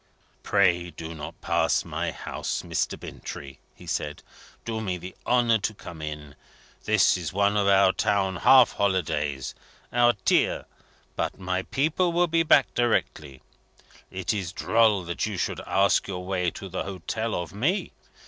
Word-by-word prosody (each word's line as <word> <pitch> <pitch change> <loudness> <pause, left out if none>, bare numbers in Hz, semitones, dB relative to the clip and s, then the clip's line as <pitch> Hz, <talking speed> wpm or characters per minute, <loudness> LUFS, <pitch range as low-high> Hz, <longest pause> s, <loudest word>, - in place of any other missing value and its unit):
"Pray 85 0 +2
do 80 0 -8
not 75 -2 -8
pass - - +1
my - - -2
house, - - -4
Mr. - - -2
Bintrey," 70 -1 -9 0.2
he - - -14
said. 75 0 -3 0.4
"Do 110 -1 -3
me 95 -4 -2
the 90 +2 -9
honour 120 -2 +3
to 110 +1 -2
come 85 -4 -10
in. 75 -1 -6 0.5
It 110 0 +4
is 80 -4 -4
one 100 +1 +2
of 100 -1 +2
our 100 -1 +5
town 95 -2 0
half 130 +5 +6
holidays 75 -9 -1 0.4
our 120 0 +5
Tir - - +2 0.5
but - - -3
my 90 0 -1
people 160 - 0
will 175 +1 +3
be 165 -1 +2
back 150 -4 +4
directly. 80 - -1 0.7
It 95 +2 -2
is 95 -5 -3
droll 110 -1 +2
that 85 +4 -2
you 105 -3 -4
should - - -2
ask 100 +1 +3
your 90 -2 -5
way 90 -2 0
to 95 - -9
the 95 0 -4
Hotel 100 +4 -3
of 90 0 -4
me. 145 - 0
95 Hz, 160 wpm, -26 LUFS, 85-110 Hz, 0.7 s, half